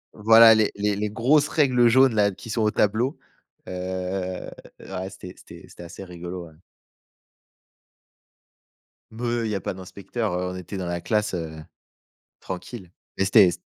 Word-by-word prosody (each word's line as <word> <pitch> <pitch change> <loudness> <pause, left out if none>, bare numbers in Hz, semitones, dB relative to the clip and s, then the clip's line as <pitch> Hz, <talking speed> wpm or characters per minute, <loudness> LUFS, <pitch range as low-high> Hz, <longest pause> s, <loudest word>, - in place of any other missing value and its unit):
Voilà 115 +1 +7
les 110 -1 +2
les 105 0 0
les 105 +1 -2
grosses 140 +8 +2
règles 125 -5 +3
jaunes-là 115 -4 +4
qui 115 +4 -10
sont 115 - -1
au 105 - +3
tableau, 110 +7 0 0.5
heu, - - -7 1.1
ouais 95 0 -6
c'était 90 -1 -11
c'était - - -14
c'était - - -14
assez 85 +3 -10
rigolo, 90 0 -8
ouais. - - -20 2.6
Meuh, 120 +1 -2
il 110 - -2
y - - -1
a 95 - -3
pas - - -3
d'inspecteur, 100 +3 -5
heu, 90 0 -3
on - - -7
était 90 +2 -7
dans 95 - -4
la 85 0 -3
classe, 105 0 0
heu, 80 -3 -5 0.8
tranquille. 90 +1 -8 0.3
Mais 95 - +1
c'était 100 0 +6
s 90 - -2
105 Hz, 155 wpm, -24 LUFS, 90-115 Hz, 2.6 s, Voilà